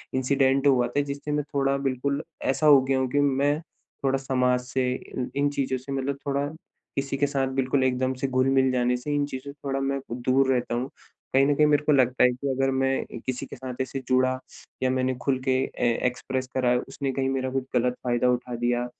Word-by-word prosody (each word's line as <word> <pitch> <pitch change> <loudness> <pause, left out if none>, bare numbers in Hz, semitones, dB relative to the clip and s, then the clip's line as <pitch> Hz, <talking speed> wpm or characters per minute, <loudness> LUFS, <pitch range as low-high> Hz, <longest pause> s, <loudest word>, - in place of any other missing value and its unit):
Incident 135 +1 +2
हुआ 125 -3 +4
था, 145 - 0
जिससे 140 +1 -5
मैं 150 0 0
थोड़ा 140 0 +2
बिल्कुल 140 +2 -1 0.2
ऐसा 145 +3 +1
हो 140 -3 +8
गया 135 0 +1
हूँ 130 - +1
कि 145 - +2
मैं 145 +1 +2 0.4
थोड़ा 135 0 +2
समाज 125 -2 +1
से 125 0 -1
इन 125 -1 -5
इन 145 +1 +2
चीज़ों 135 -2 -1
से 130 +2 -9
मतलब 135 0 -2
थोड़ा 140 +1 0 0.5
किसी 135 0 -2
के 145 - +2
साथ 135 -2 0
बिल्कुल 135 0 +1
एकदम 130 0 +1
से 135 - +1
घुल-मिल 130 0 +2
जाने 125 0 +1
से 145 +4 -4
इन 145 - +1
चीज़ों 140 0 -7
से 145 - -19
थोड़ा 135 0 -1
मैं 135 0 -1
दूर 130 +2 +2
रहता 120 -1 -1
हूँ। 125 +3 -2 0.4
कहीं 135 +1 +5
न 145 0 +2
कहीं 150 0 +4
मेरे 150 0 +3
को 150 - +2
लगता 130 -3 +3
है 125 - +7
कि 125 +3 -5
अगर 135 +1 +1
मैं 135 0 +1
अ, - - -9
किसी 130 +1 -3
के - - -9
साथ 130 0 -6
ऐसे 135 +1 -3
जुड़ा 130 0 +2 0.4
या 130 - +3
मैंने 130 0 0
खुल 130 -1 0
के 130 -1 +3
अ, - - -9 0.3
एक्सप्रेस 130 +1 -3
करा, 125 -1 +3
उसने 135 0 -3
कही 130 0 -1
मेरा 130 -1 -1
कुछ 135 0 -1
गलत 125 +1 +2
फायदा 120 0 +1
उठा 125 0 -1
दिया। 120 +1 0
130 Hz, 220 wpm, -26 LUFS, 130-140 Hz, 0.5 s, हो